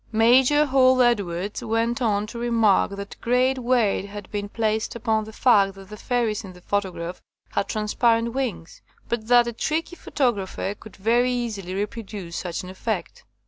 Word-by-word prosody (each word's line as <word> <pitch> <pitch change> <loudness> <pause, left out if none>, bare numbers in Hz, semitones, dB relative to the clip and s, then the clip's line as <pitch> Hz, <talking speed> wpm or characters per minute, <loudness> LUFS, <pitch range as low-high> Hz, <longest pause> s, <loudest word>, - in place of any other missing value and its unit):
Major 250 +6 +5
Hall 260 -2 +4
Edwards 200 -4 0
went 230 +2 0
on 210 -3 +1
to 235 +2 -8
remark 230 -4 +3
that 200 0 -7
great 255 +2 +2
weight 235 -6 +1
had 205 -1 -9
been 205 -1 -3
placed 220 0 -1
upon 220 -2 0
the 220 - -9
fact 200 -5 +3
that 195 -1 -13
the 210 - -8
fairies 225 -1 -1
in 190 -2 -9
the 180 - -16
photograph 185 -3 -3 0.3
had - - -1
transparent 230 +2 +1
wings, 220 -12 -4 0.3
but 225 -2 -3
that 240 0 +6
a 235 - -4
tricky 320 +8 -2
pho - - -12
tographer 205 -7 -1
could 220 - -13
very 240 +5 +2
easily 215 -7 -3
reproduce 205 -4 -5
such 175 -1 -4
an 180 - -8
effect. 190 -1 -4
220 Hz, 170 wpm, -24 LUFS, 200-240 Hz, 0.3 s, that